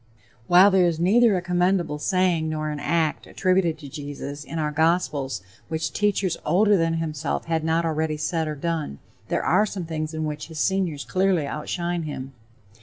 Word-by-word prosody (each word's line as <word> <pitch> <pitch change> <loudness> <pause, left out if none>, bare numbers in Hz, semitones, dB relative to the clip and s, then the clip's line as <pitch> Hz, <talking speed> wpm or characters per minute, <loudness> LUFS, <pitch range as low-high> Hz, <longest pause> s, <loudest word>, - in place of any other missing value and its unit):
While 185 +3 +7
there 185 -2 +4
is 165 -2 -1
neither 210 +4 +4
a 175 - -3
commendable 175 -3 +1
saying 180 -2 +1
nor 155 -1 -2
an 150 - -4
act 160 +1 0
attributed 185 -4 +1
to 150 -2 -10
Jesus 145 +1 -7
in 165 - -7
our 150 -1 0
gospels 150 - 0 0.2
which 160 0 -3
teachers 200 -4 +1
older 205 +6 +4
than 165 -2 +1
himself 155 -2 -2
had 165 -1 -1
not 165 +1 +1
already 155 -1 -1
said 155 +1 -1
or 155 - -3
done, 155 - -3 0.3
there - - -1
are 215 - +3
some 190 -4 -5
things 160 -1 -4
in 155 0 -2
which 150 0 -5
his 160 -2 -8
seniors 180 -7 0
clearly 185 -4 +1
outshine 170 +4 -3
him. 135 -4 -6
160 Hz, 180 wpm, -24 LUFS, 150-180 Hz, 0.3 s, While